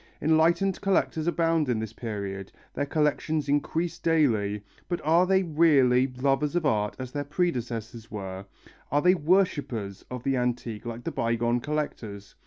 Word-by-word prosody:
Enlightened 165 +5 +2
collectors 185 -5 +1
abound 165 -4 +1
in 120 - +1
this 110 0 -4
period, 100 -5 -5 0.2
their 145 - -2
collections 150 0 0
increase 160 +4 -1
daily, 110 -11 +1 0.3
but 175 - -1
are 170 +4 +4
they 190 0 +3
really 145 -6 +4
lovers 135 +4 0
of 175 -2 +1
art 105 -7 +1
as 130 -1 -6
their 145 +1 -3
predecessors 120 - -3
were, 95 -2 -6 0.5
are 145 +2 +2
they 180 +1 +6
worshippers 145 - 0
of 125 -1 -6
the 135 -1 +1
antique 120 -3 -2
like 115 +1 -6
the - - -3
bygone 120 +1 0
collectors? 120 -9 -4
135 Hz, 150 wpm, -27 LUFS, 115-160 Hz, 0.5 s, they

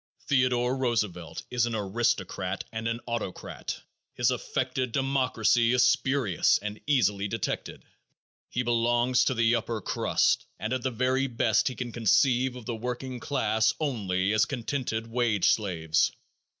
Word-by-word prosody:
Theodore 125 -2 +2
Roosevelt 105 -10 -2
is 120 -1 +1
an 115 - -2
aristocrat 100 -3 -1
and 110 0 -3
an 115 +1 -2
autocrat. 115 -6 -5 0.4
His 120 0 +2
affected 130 0 -2
democracy 125 -3 +2
is 125 - +4
spurious 130 -9 +2
and 105 +1 -6
easily 105 -8 +2
detected. - - -4 0.7
He 125 - -1
belongs 120 +1 +2
to 130 - +1
the 115 0 +3
"upper 115 -1 -1
crust" - - +1
and 110 +3 -3
at 130 - -1
the 130 - 0
very 130 +3 +1
best 120 -3 +1
he 130 - -2
can 120 -1 -5
conceive 125 +3 +2
of 125 -3 -9
the 120 - -3
working 125 +2 -5
class 110 -5 +1
only 100 -9 0
as 110 0 +4
contented 120 -3 -3
wage 115 -4 +1
slaves. 80 -7 +1
120 Hz, 140 wpm, -27 LUFS, 110-130 Hz, 0.7 s, is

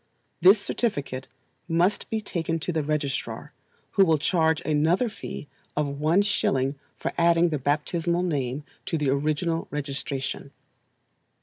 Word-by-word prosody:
This 190 +5 +8
certificate 145 - -2 0.4
must 175 +5 +2
he 220 -1 -1
taken 165 -5 -2
to 150 - -1
the 160 -2 0
registrar, 145 -2 -2 0.4
who 195 - +5
will 165 -4 +4
charge 160 0 +2
another 160 - +2
fee 180 -7 -7 0.3
of 140 -2 -1
one 165 +7 +4
shilling 135 -9 +1 0.2
for - - -3
adding 170 0 +4
the 150 -3 -1
baptisinal 165 +5 0
name 140 -5 -1 0.2
to 165 - 0
the 150 -3 +1
original 155 +4 0
registration. 140 -1 -4
155 Hz, 130 wpm, -26 LUFS, 145-175 Hz, 0.4 s, This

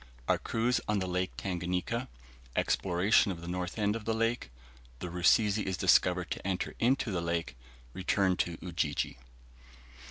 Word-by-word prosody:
OUR - - +3
CRUISE 120 +1 0
ON 105 - +1
THE 95 - -1
LAKE 90 0 -2
TANGANIKA 90 +6 -2 0.5
EXPLORATION 95 +3 +3
OF 85 -3 -6
THE 85 - -8
NORTH 90 +1 -3
END 105 0 +1
OF 115 -2 -6
THE 115 - 0
LAKE 115 +2 0 0.5
THE 90 +6 -6
RUSIZI 100 +4 +3
IS 95 -2 -1
DISCOVERED 90 0 +3
TO - - -4
ENTER 95 -2 -2
INTO 125 -1 +2
THE 90 -3 -1
LAKE 85 0 -2 0.4
RETURN 95 0 +1
TO 85 -1 -1
UJIJI. 80 -7 -2
95 Hz, 155 wpm, -31 LUFS, 90-110 Hz, 0.5 s, OUR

